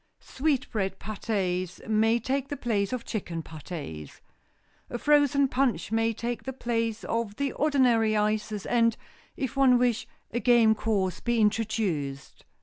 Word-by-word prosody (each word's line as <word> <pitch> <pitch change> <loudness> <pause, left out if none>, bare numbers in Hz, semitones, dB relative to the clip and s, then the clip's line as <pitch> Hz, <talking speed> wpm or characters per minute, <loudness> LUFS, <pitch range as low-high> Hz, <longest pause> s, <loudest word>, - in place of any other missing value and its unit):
Sweetbread 245 - -1
pâtés 190 -4 -3
may 220 +1 +3
take 270 +3 -1
the 285 - -5
place 210 -3 -1
of 250 -2 -4
chicken 170 -6 -4
pâtés. 150 - -8 0.7
A 240 - -3
frozen 285 0 +4
punch 260 -4 0
may 225 0 +2
take 235 +2 -4
the 265 - -5
place 230 -3 -2
of 230 -3 -2
the 280 +1 -1
ordinary 245 -7 +3
ices, 210 -1 -1
and, 230 -1 +2 0.4
if 265 0 -3
one 265 -2 +5
wish, 245 -2 +1 0.2
a 240 - -1
game 240 -3 +5
course 205 -4 -1
be 240 -1 0
introduced. 210 -11 -1
225 Hz, 140 wpm, -27 LUFS, 205-250 Hz, 0.7 s, one